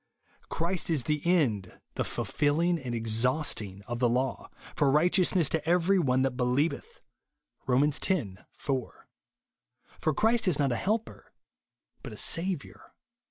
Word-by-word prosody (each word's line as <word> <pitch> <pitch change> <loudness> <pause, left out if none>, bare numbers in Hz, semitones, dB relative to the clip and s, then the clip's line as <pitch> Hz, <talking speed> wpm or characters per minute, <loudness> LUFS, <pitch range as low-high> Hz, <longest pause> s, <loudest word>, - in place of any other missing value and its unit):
" - - -34
Christ 175 +2 -2
is 155 -6 +1
the 150 +1 -1
end 125 - +1
(the - - -3
fulfilHng 160 +2 0
and 120 -2 -3
exhausting) 115 -3 -1
of 120 0 -4
the 120 -1 +3
law, 130 +3 -1 0.3
for 145 - +3
righteousness 175 +2 +3
to 160 -2 -1
every 180 +2 +3
one 130 -5 +2
that 135 - +1
be 125 +1 -2
lieveth," 155 - -1 0.6
(Rom. 130 +2 +3
x. 150 -1 0 0.6
4). 130 -4 -4 0.9
For 155 - 0
Christ 225 +3 +2
ifj 180 -6 +2
not 140 -3 +1
a - - 0
helper, 220 - -3 0.7
but - - -8
a - - -10
Saviour. 170 -3 -3
145 Hz, 145 wpm, -28 LUFS, 125-175 Hz, 0.9 s, the